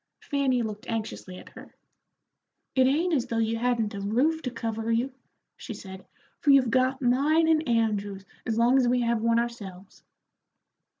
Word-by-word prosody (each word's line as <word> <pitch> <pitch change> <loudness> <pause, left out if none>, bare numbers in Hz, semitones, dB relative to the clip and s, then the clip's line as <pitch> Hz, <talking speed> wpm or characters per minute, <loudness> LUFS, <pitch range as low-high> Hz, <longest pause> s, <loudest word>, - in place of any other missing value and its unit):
Fanny 270 -4 0
looked 215 -1 -6
anxiously 215 -5 -5
at - - -12
her. - - -14 1.0
"It 260 -1 +4
ain't 330 +6 +1
as 260 -6 +1
though 230 - -2
you 225 0 0
hadn't 235 -3 0
a 200 - -5
roof 265 +11 +1
to 255 - -3
cover 225 -1 -3
you," 245 +4 0 0.4
she 230 - -7
said, 190 -2 -11 0.3
"for 295 - 0
you've 270 -4 +5
got 260 +2 +1
mine 290 +7 +3
and 315 -4 +2
Andrew's 205 -4 0 0.2
as 225 -1 -1
long 240 +3 +4
as 255 -2 +3
we 245 0 +2
have 235 -1 0
one 230 0 +2
ourselves." 200 -5 -5
235 Hz, 170 wpm, -27 LUFS, 220-260 Hz, 1.0 s, you've